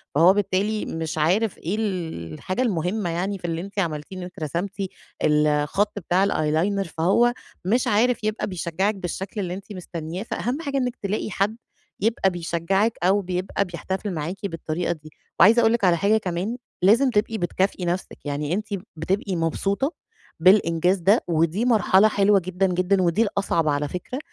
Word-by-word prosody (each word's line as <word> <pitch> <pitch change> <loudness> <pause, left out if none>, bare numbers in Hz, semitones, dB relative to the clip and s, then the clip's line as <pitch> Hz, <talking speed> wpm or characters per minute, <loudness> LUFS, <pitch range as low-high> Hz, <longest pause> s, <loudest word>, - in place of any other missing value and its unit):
فهو 170 +5 +7
بالتالي 205 +2 0
مش 160 -1 -4
عارف 185 +7 +2
إيه 175 +6 -3
ال 165 - -3
الحاجة 185 - -3
المهمّة 190 -3 0
يعني 190 +4 -2
في 175 - -10
اللي 165 0 -2
أنتِ 200 +2 -5
عملتيه، 165 +1 -3
إن 180 - -5
أنتِ 180 - -9
رسمتِ 170 +5 -2 0.5
الخَط 150 +6 +2
بتاع 180 +2 +2
الeyeliner، 175 +4 0
فهو 235 +9 +3 0.3
مش 235 +7 +2
عارف 230 +2 +2
يبقى 215 0 -1
بيشجّعِك 185 +3 -1
بالشكل 190 +3 -4
اللي 180 -2 -3
أنتِ 195 +2 -8
مستنيّاه، 175 0 -6
فأهم 250 +6 -3
حاجة 280 -3 -2
إنِك 250 -1 -1
تلاقي 205 +1 -3
حد 210 +5 0 0.4
يبقى 215 -2 +2
بيشجّعِك 175 +5 0
أو 195 +3 +4
بيبقى 185 +2 -2
بيحتفِل 190 +3 -4
معاكِ 175 +5 -4
بالطريقة 165 -1 -2
دي. 155 -2 -7 0.3
وعايزة 220 +7 +7
أقول 225 0 +4
لِك 235 - -1
على 175 -2 +4
حاجة 210 +4 +3
كمان، 195 +4 -3 0.2
لازم 235 +8 +5
تبقي 220 0 0
بتكافئي 185 0 -1
نَفسِك، 175 +2 -3
يعني 145 +2 -2
أنتِ 210 +3 -2 0.3
بتبقي 185 +3 -1
مبسوطة 195 - 0 0.5
بالإنجاز 180 0 +4
ده، 195 +6 +3
ودي 170 +6 +1
مرحلة 215 -3 +5
حلوة 200 -1 +4
جدًا، 185 +1 +1
جدًا، 185 +2 +1
ودي 180 +5 +2
الأصعَب 195 -6 0
على 145 0 +1
فكرة، 180 - -5
190 Hz, 165 wpm, -24 LUFS, 170-210 Hz, 0.5 s, فهو